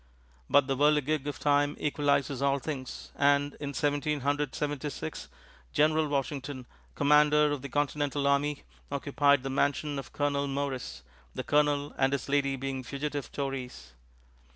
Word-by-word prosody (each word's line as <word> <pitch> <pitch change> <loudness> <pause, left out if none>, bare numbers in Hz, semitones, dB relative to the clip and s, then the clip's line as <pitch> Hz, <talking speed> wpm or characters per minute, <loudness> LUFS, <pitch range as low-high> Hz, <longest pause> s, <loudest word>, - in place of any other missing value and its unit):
But 145 - +5
the 135 0 -1
whirligig 150 0 +2
of 145 -1 -3
time 145 0 +2
equalizes 140 -2 0
all 140 0 +2
things, 135 -2 -6
and, 145 0 +3
in 140 -1 -5
Seventeen 145 0 0
Hundred 145 0 -1
Seventy 145 -1 -2
six, 80 - -6 0.5
General 155 +1 +3
Washington, 140 -2 -3 0.3
Commander 150 +1 +4
of 145 -3 -2
the 140 - -7
Continental 145 0 -1
Army, 140 +1 +1 0.3
occupied 140 -1 +2
the 135 - -3
mansion 145 +1 0
of 135 - -9
Colonel 140 -1 0
Morris, 140 -2 -4 0.3
the - - -3
Colonel 145 -1 +1
and 135 +1 +3
his 140 - -2
lady 140 -1 +1
being 135 0 -4
fugitive 140 +3 -4
Tories. 135 - -5
145 Hz, 145 wpm, -29 LUFS, 135-145 Hz, 0.5 s, But